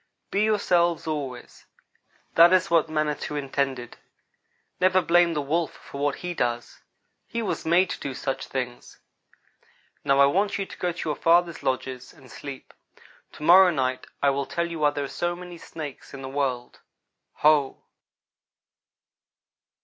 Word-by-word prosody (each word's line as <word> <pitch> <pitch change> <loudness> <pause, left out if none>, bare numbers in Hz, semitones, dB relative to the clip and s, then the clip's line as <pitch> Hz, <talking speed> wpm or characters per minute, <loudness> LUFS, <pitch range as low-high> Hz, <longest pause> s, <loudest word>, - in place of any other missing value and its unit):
"Be 200 - +1
yourselves 175 -6 +2
always. 140 -6 -6 0.7
That 170 +1 +7
is 185 0 +2
what 165 -2 +3
Manitou 150 -1 -2
intended. 135 -3 -3 0.8
Never 185 +1 +4
blame 175 -1 +3
the 150 - -1
Wolf 160 +3 -1
for 140 - -9
what 145 -1 +1
he 175 - -2
does. 120 -6 -3 0.5
He 230 0 -3
was 195 - -3
made 180 +3 +3
to - - -5
do 135 -2 -5
such 135 0 -4
things. 125 -2 -5 1.1
Now 140 -1 +3
I 140 - +8
want 195 +8 +1
you 195 - -2
to - - -12
go 180 - 0
to 170 - -6
your 150 - -1
fathers' 170 0 +2
lodges 130 -1 -3
and 135 -6 -17
sleep. 140 -2 -9 0.6
To - - -10
morrow 185 +3 +8
night 130 -5 -1 0.2
I 140 - +5
will 140 0 -2
tell 170 - -1
you 165 -1 -6
why 150 -1 +4
there 145 0 -3
are - - -3
so 175 +4 -2
many 175 -1 -10
snakes 150 -5 -9
in 135 - -9
the - - -5
world. 130 -3 -3 0.7
Ho!" 150 -3 +3
150 Hz, 155 wpm, -25 LUFS, 135-175 Hz, 1.1 s, I